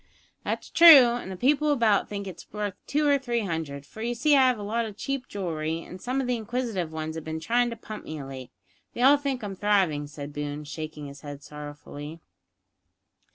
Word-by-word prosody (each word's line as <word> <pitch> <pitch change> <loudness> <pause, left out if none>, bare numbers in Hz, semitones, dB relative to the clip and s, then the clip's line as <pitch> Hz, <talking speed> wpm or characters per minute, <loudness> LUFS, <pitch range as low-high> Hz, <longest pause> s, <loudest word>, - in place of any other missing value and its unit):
"That's - - -4
true, 310 -8 +10
an' 240 -5 -5
the 190 - -5
people 295 +8 +2
about 230 -7 +2
think 200 -1 -4
it's 190 -3 -10
worth 210 -1 -3
two 295 +1 +1
or 285 -1 +4
three 240 -3 -1
hundred, 160 -7 -4
for 220 - -11
you 240 +1 -1
see 290 +5 +4
I 265 -2 +6
have 250 -2 +2
a 205 - -6
lot 225 +3 -1
o' 220 - -5
cheap 265 +5 -4
jewellery, 165 -4 -3
and 185 - -11
some 255 +5 -1
of 265 - -1
the 250 0 0
inquisitive 220 -7 -3
ones 160 0 -4
have 160 -1 -6
been 160 0 -4
trying 240 +9 +1
to 230 - -5
pump 215 -1 -9
me 155 - -6
of 135 - -7
late. 130 -2 -8 0.5
They 245 - -1
all 280 +2 +7
think 275 -4 -3
I'm 200 -2 -4
thriving," 185 -8 +1
said 145 0 -8
Boone, 145 0 -4
shaking 150 0 -7
his 140 0 -10
head 145 -1 -8
sorrowfully. 150 +1 -9
200 Hz, 215 wpm, -27 LUFS, 155-245 Hz, 0.5 s, true